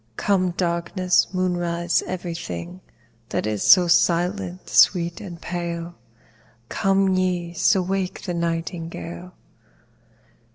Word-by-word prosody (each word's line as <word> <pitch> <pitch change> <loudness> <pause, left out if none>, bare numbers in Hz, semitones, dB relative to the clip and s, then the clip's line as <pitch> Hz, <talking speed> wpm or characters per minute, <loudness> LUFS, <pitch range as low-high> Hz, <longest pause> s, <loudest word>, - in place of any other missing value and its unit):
Come 185 -3 +1
darkness, 175 +1 +1
moonrise, 175 -2 0
every 175 -2 -4
thing 170 +2 -7 0.5
That - - -2
is 105 -2 -2
so 180 -2 +6
silent, 180 +2 +1
sweet, 170 -2 +3
and 175 -4 -8
pale: 170 -1 -4 0.8
Come, 195 -1 +2 0.4
so 185 +2 +2
ye - - -8
wake 190 -1 -2
the 180 - -3
nightingale. 170 +1 -4
175 Hz, 100 wpm, -23 LUFS, 170-185 Hz, 0.8 s, so